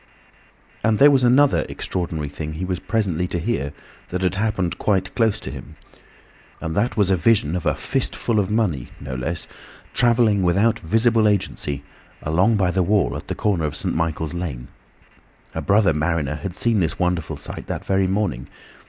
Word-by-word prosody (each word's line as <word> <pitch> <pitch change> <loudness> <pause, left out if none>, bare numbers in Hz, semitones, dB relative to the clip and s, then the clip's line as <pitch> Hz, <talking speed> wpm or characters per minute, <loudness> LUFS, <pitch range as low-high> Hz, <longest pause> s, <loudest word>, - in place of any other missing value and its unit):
And 110 -1 +3
there 145 +4 +7
was 135 -2 +3
another 135 +3 +4
extraordinary 85 -5 -3
thing 75 +2 -6
he 85 +4 -4
was 90 -1 -2
presently 90 -6 -1
to 90 - -3
hear, 85 -6 -1 0.4
that 90 +1 -3
had 90 - +2
happened 95 -3 -1
quite 95 -3 0
close 110 -3 +1
to 65 - -6
him. 70 +2 -10 0.8
And 80 0 -4
that 115 +5 0
was 100 -2 +3
a - - +5
vision 90 -2 +2
of 90 - -2
a - - +2
"fist - - -1
full 115 -3 0
of 95 - 0
money" 105 - 0
(no 70 -2 -6
less) 80 +6 -3 0.5
travelling 115 -4 +3
without 100 +6 +2
visible 110 +4 +3
agency, 75 -8 -1 0.4
along 90 +9 +3
by 95 -3 +2
the 95 - +1
wall 100 +2 +2
at - - -7
the - - -3
corner 95 -7 0
of 75 - -3
St. - - -2
Michael's 80 -1 -1
Lane. 75 -9 -5 0.8
A - - -3
brother 100 -4 +3
mariner 75 -1 0
had 85 +4 -5
seen 115 +1 +1
this 80 -4 0
wonderful 90 -3 -1
sight - - -7
that - - -4
very 95 -1 +2
morning. 95 - -1
90 Hz, 180 wpm, -22 LUFS, 80-105 Hz, 0.8 s, there